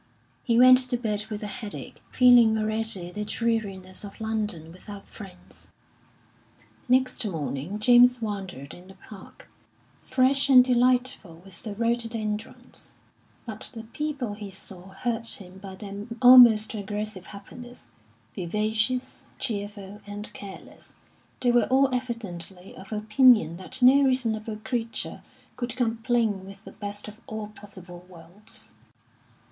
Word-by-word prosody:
He 230 -1 +2
went 255 +1 +8
to 245 - 0
bed 215 -3 -3
with 210 0 -5
a - - -3
headache, 205 +1 -7
feeling 240 -3 +6
already 215 -4 -1
the 210 +3 -4
dreariness 205 -5 -2
of 200 - -10
London 215 -7 -3
without 200 +3 -11
friends. 190 -4 -11 1.2
Next 255 0 +2
morning 165 -1 -4
James 245 +2 +5
wandered 195 - -6
in 180 +1 -14
the 190 - -14
Park, 195 0 -14 0.5
fresh 265 +2 +1
and 255 -2 +8
delightful 245 -8 +1
with 195 -3 -11
the 215 -3 -5
rhododendrons; 225 -2 -4 0.5
but 220 -3 -6
the 225 - -7
people 260 -1 -4
he 205 -1 -8
saw 190 -1 -9
hurt 230 +4 -4
him 190 -1 -13
by 190 -1 -9
their 200 +1 -8
almost 240 -4 +8
aggressive 205 -2 -5
happiness 240 +5 -12 0.5
vivacious, 215 +6 -2 0.2
cheerful, 205 -3 -5
and 205 +1 -7
careless, 195 -2 -11 0.5
they 245 - +3
were 240 -2 +4
all 265 0 +3
evidently 195 -7 -6
of 195 +2 -13
opinion 215 - +4
that 250 +8 -7
no 265 +3 +7
reasonable 230 -5 0
creature 230 -2 -4 0.3
could 240 -1 -4
complain 230 -4 0
with 195 +2 -13
the - - -10
best 205 0 -7
of 210 0 -10
all 220 -1 -6
possible 185 -4 -13
worlds. 175 +4 -10
215 Hz, 130 wpm, -26 LUFS, 195-240 Hz, 1.2 s, went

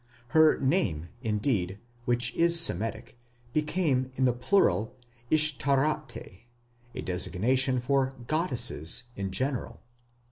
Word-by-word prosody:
Her 155 +3 +4
name, 105 - 0
indeed, 105 -4 -1 0.3
which 120 -1 +1
is 170 0 +4
Semitic, 115 -5 0 0.3
became 150 -4 0
in 130 - +1
the 125 - +3
plural, 120 - +1 0.4
Ishtaráte, 145 -7 0 0.5
a 125 - -4
designation 125 +8 +1
for 135 +1 0
goddesses 125 - 0
in 100 -1 -4
general. 130 +6 -3
130 Hz, 100 wpm, -28 LUFS, 110-150 Hz, 0.5 s, Her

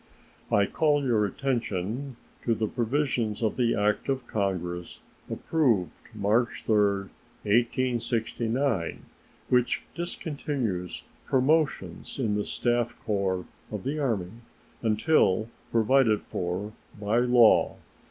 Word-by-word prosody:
I 100 - +4
call 145 +5 +2
your 110 -5 +3
attention 120 +1 -2 0.3
to 115 - +2
the 110 - 0
provisions 120 -2 -1
of 110 - +1
the 120 -2 +2
act 105 +4 0
of 130 -2 -1
Congress 90 -5 -3 0.3
approved 120 - +1 0.2
March 115 +4 +1
3, 110 - +3 0.7
1869, 120 - 0 0.5
which 125 -1 +2
discontinues 140 - -3 0.2
promotions 150 +5 +1
in 115 -6 0
the 105 0 -1
staff 120 -1 0
corps 95 -4 0 0.3
of - - -4
the 145 +4 -2
Army 105 -11 -1 0.5
until 110 - +2 0.2
provided 115 -1 +3
for 90 +4 -3 0.3
by 105 +3 +1
law. 120 -2 +5
115 Hz, 105 wpm, -27 LUFS, 105-130 Hz, 0.7 s, law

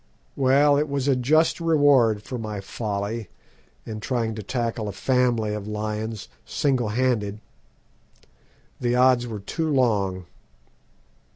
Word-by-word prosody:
"Well, 140 +2 +4
it 150 0 -1
was 140 -1 -1
a 135 - +4
just 155 +8 +2
reward 140 -10 +4
for 125 +2 -6
my 105 -2 -5
folly 105 +1 -4 0.6
in 110 -1 -6
trying 115 -1 -1
to 110 - -6
tackle 115 0 -2
a - - -3
family 120 -2 +1
of 105 -1 -5
lions 105 0 -4 0.2
single 130 -6 0
handed. 110 -3 0 1.4
The 120 0 0
odds 125 -1 +4
were 110 -3 -6
too 160 +10 -2
long. 100 -9 +1
115 Hz, 125 wpm, -24 LUFS, 105-130 Hz, 1.4 s, Well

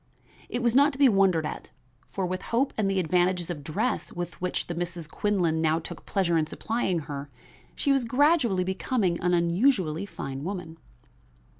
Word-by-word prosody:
It 245 - -2
was 235 0 +2
not 285 +2 +5
to - - -8
be 280 -1 +6
wondered 195 -7 +3
at, - - -6 0.4
for 195 - -3
with 185 +1 -3
hope 255 +4 0
and 210 -3 +1
the 195 -1 +1
advantages 180 0 +1
of 150 -4 -6
dress 210 - -2
with 175 0 -5
which 180 - -1
the 175 - -4
Misses 170 -1 -4
Quinlan 175 -4 0
now 160 0 +2
took 165 - -8
pleasure 170 -4 +1
in 155 - 0
supplying 190 -4 -1
her, 145 -1 -6 0.5
she 280 - +1
was 270 -2 +3
gradually 250 - +3
becoming 190 -1 0
an 180 0 +2
unusually 175 - +1
fine 135 -7 -6
woman. 175 -3 -5
185 Hz, 175 wpm, -27 LUFS, 165-225 Hz, 0.5 s, be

